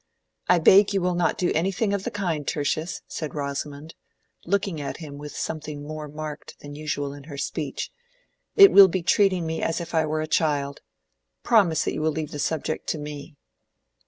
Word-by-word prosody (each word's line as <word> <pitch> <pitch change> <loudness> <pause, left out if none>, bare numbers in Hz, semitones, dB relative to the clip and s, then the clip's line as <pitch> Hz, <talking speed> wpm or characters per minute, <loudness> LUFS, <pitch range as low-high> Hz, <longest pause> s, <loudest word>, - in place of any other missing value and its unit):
"I 180 - +6
beg 195 +5 +6
you 195 - +1
will 180 0 +1
not 175 0 +1
do 180 - +1
anything 195 +5 0
of 200 -1 -2
the - - -1
kind, 170 -8 -3
Tertius," 155 +3 -2
said 155 -2 -5
Rosamond, 145 +2 -5 0.5
looking 190 -4 0
at 140 - -5
him 145 -3 -9
with 145 0 -8
something 150 -2 -5
more 155 0 -6
marked 150 0 -8
than 145 0 -9
usual 145 -1 -3
in 140 -1 -11
her 145 -2 -8
speech. 140 0 -4 0.6
"It 395 -1 +9
will 200 -1 +9
be 185 -1 -2
treating 185 -2 +3
me 160 0 -3
as 165 - -1
if 170 0 -7
I 160 -1 +2
were 155 +1 -1
a - - -1
child. 145 -3 0 0.6
Promise 195 -9 +3
that - - -2
you - - -3
will 160 - +2
leave 155 -1 -4
the 145 - -6
subject 155 +1 -2
to - - -1
me." 150 +1 -8
155 Hz, 190 wpm, -25 LUFS, 145-175 Hz, 0.6 s, It